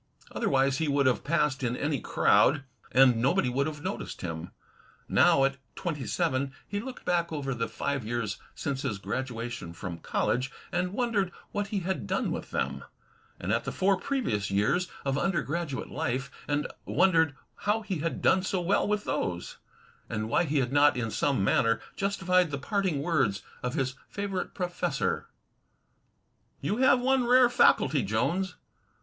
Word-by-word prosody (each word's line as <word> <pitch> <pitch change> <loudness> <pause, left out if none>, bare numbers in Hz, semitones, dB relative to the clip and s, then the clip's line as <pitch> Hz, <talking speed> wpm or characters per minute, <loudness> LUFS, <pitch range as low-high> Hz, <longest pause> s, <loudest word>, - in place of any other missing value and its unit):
Otherwise 135 0 +1
he 160 - 0
would 140 -1 +2
have 130 -2 +2
passed 150 -4 +1
in 125 0 0
any 145 -2 0
crowd, 145 -1 +3 0.3
and 130 -2 +6
nobody 125 +1 +2
would 140 +3 0
have 150 -1 -6
noticed 190 +2 -4
him 80 -2 -4
pass. - - -17 0.5
Now, 135 - +5
at 135 0 +1 0.2
twenty 150 -7 -3
seven, 140 -5 0
he 205 - -2
looked 260 +4 -8
back 170 -1 +1
over 140 -3 -2
the 115 -1 -2
five 140 -3 -2
years 110 -2 -2 0.2
since 135 -1 -3
his 125 -8 -2
graduation 115 -5 -4
from 85 -1 -6
college 130 +9 0 0.2
and 180 +1 -1
wondered 210 -6 0 0.2
what 205 -1 -2
he 200 -1 -2
had 180 - -2
done - - 0
with - - -4
them; 65 +1 -2 0.6
and 95 - -2
at 115 - +1
the - - -3
four 195 +1 +2
previous 185 - -1
years 130 - +2 0.2
of 135 0 +1
undergraduate 170 -5 -2
life 135 +2 -2 0.2
and 145 0 0 0.2
wondered 165 -6 +3 0.3
how 215 +2 +2
he 190 -6 -3
had 165 +2 -3
done 190 - +5
so 185 0 -1
well 180 +3 +1
with 210 0 0
those, 90 -1 -3 0.5
and 110 -1 -2
why 175 - +3
he 150 -1 0
had 130 -1 0
not 145 -1 +5
in 115 -2 -2
some 135 -5 +1
manner 115 +3 +3 0.2
justified 185 -3 +2
the 140 - -3
parting 185 -3 -1
words 135 - +1 0.2
of 125 0 -2
his 130 -1 0 0.2
favorite 200 -2 -3
professor: 180 -2 -1 1.3
"You 210 - -1
have 255 0 +5
one 260 -1 +2
rare 250 0 +6
faculty, 155 - +4
Jones. 140 - 0
145 Hz, 165 wpm, -28 LUFS, 125-185 Hz, 1.3 s, and